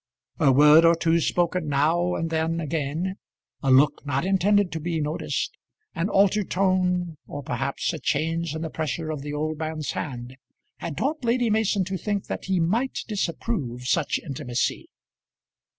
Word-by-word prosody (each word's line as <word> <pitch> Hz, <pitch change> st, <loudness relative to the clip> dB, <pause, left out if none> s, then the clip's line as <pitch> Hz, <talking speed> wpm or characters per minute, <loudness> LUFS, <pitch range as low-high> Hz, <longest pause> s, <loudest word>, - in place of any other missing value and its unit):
A 145 Hz, -4 st, +5 dB
word 150 Hz, +4 st, +7 dB
or 165 Hz, 0 st, +6 dB
two 165 Hz, 0 st, +2 dB
spoken 175 Hz, 0 st, 0 dB
now 160 Hz, +5 st, +2 dB
and 165 Hz, 0 st, -2 dB
then 165 Hz, +1 st, 0 dB
again, 160 Hz, +4 st, -2 dB, 0.4 s
a 135 Hz, -, 0 dB
look 135 Hz, +3 st, +4 dB
not 140 Hz, +2 st, -1 dB
intended 195 Hz, 0 st, +3 dB
to 160 Hz, -, -3 dB
be 165 Hz, +1 st, -2 dB
noticed, 150 Hz, +2 st, -2 dB, 0.4 s
an 175 Hz, +2 st, -1 dB
altered 200 Hz, 0 st, +3 dB
tone, 180 Hz, -3 st, +1 dB
or 145 Hz, -, -6 dB
perhaps 135 Hz, +6 st, -2 dB
a 160 Hz, -, -5 dB
change 165 Hz, +2 st, -1 dB
in 160 Hz, -, -4 dB
the 160 Hz, -, -4 dB
pressure 155 Hz, +1 st, -3 dB
of 150 Hz, -3 st, -4 dB
the 145 Hz, +1 st, -5 dB
old 155 Hz, +1 st, -2 dB
man's 155 Hz, -1 st, -3 dB
hand, 125 Hz, -2 st, -6 dB, 0.4 s
had 165 Hz, -4 st, -6 dB
taught 295 Hz, +1 st, -1 dB
Lady 235 Hz, -1 st, +2 dB
Mason 210 Hz, -2 st, +2 dB
to 190 Hz, +1 st, -3 dB
think 205 Hz, +1 st, -2 dB
that -, -, -5 dB
he 190 Hz, -1 st, +1 dB
might 225 Hz, +11 st, 0 dB
disapprove 170 Hz, -, -3 dB
such 155 Hz, +3 st, +1 dB
intimacy. 130 Hz, -4 st, -2 dB
165 Hz, 165 wpm, -25 LUFS, 150-185 Hz, 0.4 s, word